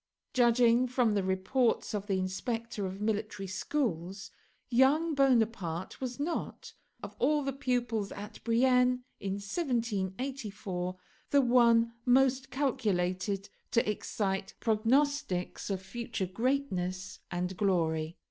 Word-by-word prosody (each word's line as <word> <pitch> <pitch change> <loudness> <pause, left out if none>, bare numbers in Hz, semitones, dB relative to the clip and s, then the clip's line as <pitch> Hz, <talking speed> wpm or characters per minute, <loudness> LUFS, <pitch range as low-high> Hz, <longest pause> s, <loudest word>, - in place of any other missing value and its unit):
Judging 240 0 +4
from 245 -3 +2
the 205 - +2
reports 190 +8 +1
of 205 -1 -3
the 195 -2 +1
inspector 210 +3 -3
of 190 +1 -7
military 210 -1 -2
schools, 195 - -2 0.4
young 285 +7 +4
Bonaparte 225 - +1
was 255 0 -4
not, 325 +4 -3 0.3
of - - -7
all 295 +3 +2
the 275 0 -2
pupils 245 -6 -1
at 210 +1 -9
Brienne 250 +1 +3 0.2
in 195 -1 -2
1784, 205 - -3 0.3
the 285 - +5
one 235 -2 +4
most 265 +1 +3
calculated 195 -7 -1 0.2
to 235 - +2
excite 195 -2 -2
prognostics 230 -4 +1
of 195 -2 -1
future 230 0 -4
greatness 185 -4 -2
and 180 +1 -2
glory. 165 -4 0
225 Hz, 110 wpm, -31 LUFS, 190-255 Hz, 0.4 s, the